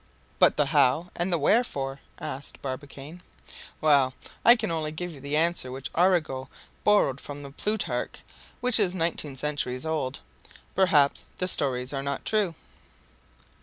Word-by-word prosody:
"But -, -, +5 dB
the -, -, +3 dB
how 155 Hz, +8 st, +2 dB
and 175 Hz, +2 st, -1 dB
the 170 Hz, -, +3 dB
wherefore?" 140 Hz, -, +1 dB, 0.2 s
asked 135 Hz, +2 st, -6 dB
Barbicane. 140 Hz, +4 st, -7 dB, 0.6 s
"Well, 140 Hz, -4 st, +4 dB, 0.3 s
I 235 Hz, -, +9 dB
can 220 Hz, -6 st, -3 dB
only 155 Hz, -2 st, -2 dB
give 175 Hz, +3 st, -5 dB
you 145 Hz, -, -11 dB
the 140 Hz, +2 st, -1 dB
answer 165 Hz, -5 st, +1 dB
which 135 Hz, +2 st, -6 dB
Arago 160 Hz, -7 st, +1 dB, 0.3 s
borrowed 205 Hz, -11 st, +3 dB
from 145 Hz, -1 st, -8 dB
Plutarch, 170 Hz, -, -2 dB, 0.4 s
which 250 Hz, -2 st, +4 dB
is 190 Hz, -3 st, +1 dB
nineteen 165 Hz, -5 st, -2 dB
centuries 135 Hz, -1 st, -3 dB
old. 145 Hz, -4 st, -2 dB, 0.5 s
'Perhaps 150 Hz, -7 st, +3 dB
the 180 Hz, -, -1 dB
stories 130 Hz, -5 st, +2 dB
are 135 Hz, -, -2 dB
not 140 Hz, 0 st, -4 dB
true! 205 Hz, -6 st, +1 dB
150 Hz, 140 wpm, -27 LUFS, 135-175 Hz, 0.6 s, I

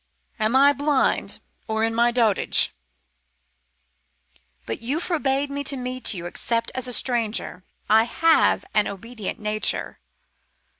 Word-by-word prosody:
"Am 220 Hz, +3 st, +1 dB
I 280 Hz, +2 st, +6 dB
blind 285 Hz, -1 st, 0 dB, 0.3 s
or 220 Hz, 0 st, -1 dB
in 225 Hz, 0 st, 0 dB
my 235 Hz, +1 st, +3 dB
dotage? 230 Hz, -5 st, +3 dB, 1.9 s
But 115 Hz, -, -5 dB
you 265 Hz, +7 st, -2 dB
forbade 285 Hz, -5 st, -1 dB
me 285 Hz, 0 st, -3 dB
to 275 Hz, 0 st, -1 dB
meet 255 Hz, 0 st, -3 dB
you 175 Hz, -1 st, -6 dB
except 230 Hz, +6 st, -2 dB
as 260 Hz, -1 st, -3 dB
a -, -, -3 dB
stranger. 230 Hz, -7 st, -1 dB, 0.2 s
I 220 Hz, +1 st, +5 dB
have 325 Hz, +6 st, +2 dB
an 210 Hz, -1 st, +2 dB
obedient 215 Hz, +2 st, -6 dB
nature." 210 Hz, 0 st, -2 dB
240 Hz, 130 wpm, -23 LUFS, 220-275 Hz, 1.9 s, I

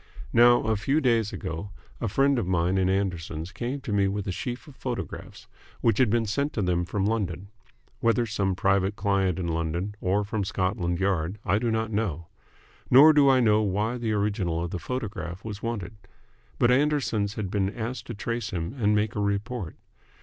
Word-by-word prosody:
Now, 120 Hz, +1 st, +6 dB
a 110 Hz, 0 st, +1 dB
few 135 Hz, +9 st, +1 dB
days 115 Hz, -7 st, +2 dB
ago, 80 Hz, +5 st, -5 dB, 0.3 s
a 115 Hz, -, -1 dB
friend 135 Hz, +5 st, +2 dB
of 95 Hz, -, -2 dB
mine 90 Hz, +1 st, +1 dB
in 95 Hz, 0 st, +2 dB
Anderson's 90 Hz, -3 st, -2 dB
came 125 Hz, +5 st, -4 dB
to 120 Hz, -7 st, -4 dB
me 100 Hz, -1 st, +3 dB
with 100 Hz, 0 st, -2 dB
a -, -, 0 dB
sheaf 120 Hz, -, -5 dB
of 145 Hz, -, -13 dB
photographs, 125 Hz, -3 st, -6 dB, 0.4 s
which 115 Hz, -, +2 dB
had 130 Hz, -4 st, +4 dB
been 115 Hz, +1 st, +1 dB
sent 140 Hz, +8 st, -1 dB
to 105 Hz, -, -1 dB
them 90 Hz, -1 st, +1 dB
from 95 Hz, +2 st, -1 dB
London. 100 Hz, -3 st, -2 dB, 0.5 s
Whether 115 Hz, +1 st, +2 dB
some 100 Hz, -3 st, -1 dB
private 95 Hz, +1 st, +1 dB
client 95 Hz, -3 st, +1 dB
in 90 Hz, -2 st, -2 dB
London 85 Hz, +4 st, -2 dB
or 100 Hz, +3 st, +1 dB
from 105 Hz, 0 st, -2 dB
Scotland 95 Hz, -2 st, -1 dB
Yard 95 Hz, -1 st, 0 dB
I 100 Hz, +3 st, +2 dB
do 120 Hz, 0 st, 0 dB
not 110 Hz, 0 st, -1 dB
know. 100 Hz, -7 st, -2 dB, 0.6 s
Nor 150 Hz, +5 st, +8 dB
do 145 Hz, -2 st, +5 dB
I 130 Hz, -1 st, +5 dB
know 110 Hz, -2 st, +4 dB
why 105 Hz, +4 st, -1 dB
the 115 Hz, -2 st, -1 dB
original 100 Hz, -5 st, 0 dB
of 85 Hz, -, -4 dB
the 90 Hz, -, -3 dB
photograph 100 Hz, -7 st, -5 dB
was 105 Hz, -2 st, -6 dB
wanted. 115 Hz, -4 st, -4 dB, 0.6 s
But 120 Hz, -, +4 dB
Anderson's 125 Hz, -7 st, +1 dB
had 100 Hz, -4 st, -4 dB
been 100 Hz, -2 st, +1 dB
asked 120 Hz, +3 st, -5 dB
to 120 Hz, -, -5 dB
trace 115 Hz, +3 st, -3 dB
him 85 Hz, +3 st, -4 dB
and 105 Hz, -2 st, +3 dB
make 105 Hz, +1 st, +1 dB
a -, -, -1 dB
report. 100 Hz, -2 st, -2 dB
105 Hz, 195 wpm, -26 LUFS, 95-115 Hz, 0.6 s, Nor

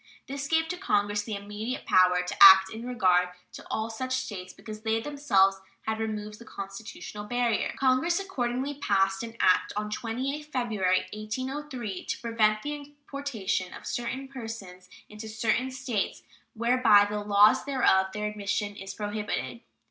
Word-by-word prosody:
This 275 Hz, 0 st, -5 dB
gave 320 Hz, +1 st, +2 dB
to 360 Hz, -, -3 dB
Congress 205 Hz, -, +1 dB
the 210 Hz, 0 st, -5 dB
immediate 210 Hz, +5 st, -5 dB
power 180 Hz, -1 st, +4 dB
to 180 Hz, -, -5 dB
act 190 Hz, 0 st, +10 dB
in 230 Hz, +2 st, -7 dB
regard 185 Hz, -7 st, +3 dB, 0.2 s
to -, -, -9 dB
all 220 Hz, +1 st, -2 dB
such 255 Hz, +3 st, -3 dB
States, 200 Hz, -8 st, -5 dB
because 215 Hz, -1 st, -10 dB
they 220 Hz, 0 st, +1 dB
themselves 210 Hz, -8 st, +2 dB, 0.2 s
had 220 Hz, 0 st, -2 dB
removed 215 Hz, -1 st, -4 dB
the -, -, -11 dB
constitutional 205 Hz, 0 st, -8 dB
barrier. 240 Hz, 0 st, 0 dB
Congress 275 Hz, +7 st, +2 dB
accordingly 265 Hz, -7 st, -2 dB
passed 195 Hz, -8 st, +1 dB
an 230 Hz, 0 st, -7 dB
act 185 Hz, -, +3 dB
on 210 Hz, 0 st, -3 dB
28th 260 Hz, +7 st, -3 dB
February, 220 Hz, -10 st, 0 dB
1803, 245 Hz, 0 st, -5 dB
"to -, -, -3 dB
prevent 215 Hz, -2 st, +1 dB
the 295 Hz, -, -3 dB
importation 280 Hz, -10 st, -4 dB
of -, -, -11 dB
certain 255 Hz, +3 st, -3 dB
persons 225 Hz, -8 st, -8 dB, 0.2 s
into 210 Hz, +1 st, -9 dB
certain 225 Hz, +4 st, 0 dB
States 255 Hz, -5 st, -3 dB, 0.3 s
where 235 Hz, +3 st, +1 dB
by 210 Hz, -4 st, +7 dB
the 210 Hz, 0 st, -3 dB
laws 205 Hz, +1 st, +5 dB
thereof 250 Hz, -9 st, +3 dB
their 210 Hz, +1 st, -3 dB
admission 205 Hz, 0 st, -2 dB
is 195 Hz, -1 st, -8 dB
prohibited." 205 Hz, -, -3 dB
220 Hz, 155 wpm, -28 LUFS, 205-255 Hz, 0.3 s, act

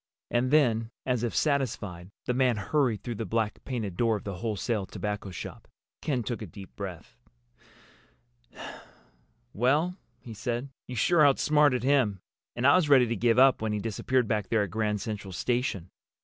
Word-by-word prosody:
And 120 Hz, +1 st, +1 dB
then, 120 Hz, -7 st, +3 dB, 0.2 s
as 125 Hz, -3 st, 0 dB
if 120 Hz, -2 st, -2 dB
satisfied, 105 Hz, -, -1 dB, 0.2 s
the 125 Hz, -, 0 dB
man 125 Hz, -2 st, +2 dB
hurried 115 Hz, +2 st, 0 dB
through 120 Hz, -, -3 dB
the -, -, 0 dB
black 110 Hz, -2 st, -1 dB
painted 110 Hz, -8 st, -3 dB
door 115 Hz, -2 st, +2 dB
of 105 Hz, -, -5 dB
the 100 Hz, -3 st, -5 dB
wholesale 105 Hz, 0 st, -2 dB
tobacco 105 Hz, 0 st, -4 dB
shop. 90 Hz, -, -8 dB, 0.3 s
Ken 130 Hz, -6 st, -1 dB
took 115 Hz, +1 st, -4 dB
a 105 Hz, -, -5 dB
deep 95 Hz, +2 st, -12 dB
breath. 90 Hz, -10 st, -8 dB, 2.3 s
"Well," 150 Hz, -, +1 dB, 0.2 s
he 115 Hz, -, -10 dB
said, 120 Hz, +4 st, -3 dB, 0.2 s
"you 125 Hz, -, -6 dB
sure 155 Hz, +8 st, +4 dB
outsmarted 145 Hz, -2 st, +4 dB
him! 130 Hz, -8 st, +2 dB, 0.4 s
And 120 Hz, -, -1 dB
I 140 Hz, -, +7 dB
was 165 Hz, -5 st, +1 dB
ready 130 Hz, -3 st, +7 dB
to 115 Hz, 0 st, -2 dB
give 115 Hz, +2 st, +2 dB
up 130 Hz, -2 st, +6 dB
when 110 Hz, -1 st, -1 dB
he 105 Hz, -, -1 dB
disappeared 115 Hz, +3 st, 0 dB
back 105 Hz, -3 st, -1 dB
there 110 Hz, -2 st, +2 dB
at 100 Hz, -, -5 dB
Grand 105 Hz, 0 st, -1 dB
Central 105 Hz, -4 st, -5 dB
Station. 120 Hz, -5 st, -1 dB
115 Hz, 170 wpm, -28 LUFS, 105-130 Hz, 2.3 s, I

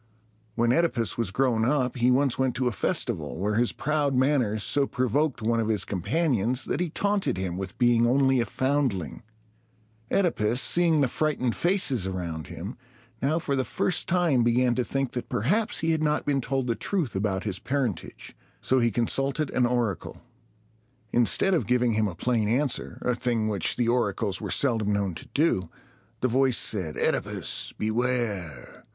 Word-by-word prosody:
When 120 Hz, 0 st, +2 dB
OEdipus 125 Hz, -, +1 dB
was 115 Hz, -4 st, -1 dB
grown 115 Hz, +1 st, +1 dB
up, 130 Hz, +1 st, +1 dB
he 125 Hz, 0 st, +2 dB
once 130 Hz, 0 st, +2 dB
went 130 Hz, -2 st, +1 dB
to 125 Hz, +1 st, 0 dB
a -, -, +1 dB
festival, 80 Hz, -7 st, -1 dB
where 100 Hz, +4 st, -1 dB
his 120 Hz, +2 st, +2 dB
proud 150 Hz, -3 st, -1 dB
manners 125 Hz, -6 st, +1 dB
so 140 Hz, -1 st, +2 dB
provoked 130 Hz, +1 st, 0 dB
one 115 Hz, +1 st, +1 dB
of 110 Hz, -, 0 dB
his 105 Hz, -4 st, +1 dB
companions, 120 Hz, -, 0 dB
that -, -, -2 dB
he 180 Hz, -1 st, -1 dB
taunted 200 Hz, -, 0 dB
him 95 Hz, -2 st, -3 dB
with 95 Hz, 0 st, -6 dB
being 120 Hz, -1 st, +3 dB
only 135 Hz, +1 st, +3 dB
a 120 Hz, -, 0 dB
foundling. 130 Hz, -, -1 dB, 0.9 s
OEdipus, 125 Hz, -, +1 dB
seeing 165 Hz, +3 st, +3 dB
the 135 Hz, -, +3 dB
frightened 130 Hz, -3 st, -1 dB
faces 160 Hz, -, +1 dB
around 85 Hz, -5 st, -4 dB
him, 100 Hz, +8 st, -7 dB, 0.4 s
now 145 Hz, +4 st, +1 dB
for 150 Hz, -4 st, -1 dB
the 130 Hz, -, +1 dB
first 175 Hz, +6 st, -1 dB
time 170 Hz, -8 st, +2 dB
began 120 Hz, +1 st, +2 dB
to 125 Hz, -, 0 dB
think 135 Hz, 0 st, -2 dB
that 125 Hz, -, -5 dB
perhaps 205 Hz, -, 0 dB
he 165 Hz, 0 st, +1 dB
had 160 Hz, -1 st, 0 dB
not 150 Hz, -1 st, 0 dB
been 140 Hz, -2 st, +1 dB
told 135 Hz, +1 st, -1 dB
the 120 Hz, -, 0 dB
truth 160 Hz, -, -2 dB
about 95 Hz, -1 st, -1 dB
his 100 Hz, -3 st, -3 dB
parentage. 125 Hz, -, -4 dB, 0.2 s
So 130 Hz, -, +1 dB
he 120 Hz, -1 st, +3 dB
consulted 135 Hz, +6 st, 0 dB
an 125 Hz, -1 st, +2 dB
oracle. 120 Hz, -7 st, -2 dB, 0.9 s
Instead 120 Hz, -, +2 dB
of 170 Hz, -, 0 dB
giving 125 Hz, -1 st, +2 dB
him 110 Hz, 0 st, +1 dB
a 90 Hz, -, -6 dB
plain 115 Hz, +2 st, 0 dB
answer, 130 Hz, +3 st, -1 dB
a 125 Hz, -, +1 dB
thing 115 Hz, -2 st, -1 dB
which 100 Hz, -5 st, 0 dB
the 120 Hz, -, 0 dB
oracles 110 Hz, -4 st, 0 dB
were -, -, -4 dB
seldom 115 Hz, -6 st, +1 dB
known 100 Hz, -3 st, -1 dB
to 80 Hz, -, -10 dB
do, 120 Hz, -, +1 dB, 0.5 s
the 130 Hz, -, +2 dB
voice 130 Hz, 0 st, +2 dB
said, 90 Hz, -8 st, -1 dB
"OEdipus, -, -, -1 dB
beware! 110 Hz, -, -2 dB
125 Hz, 175 wpm, -26 LUFS, 105-140 Hz, 0.9 s, being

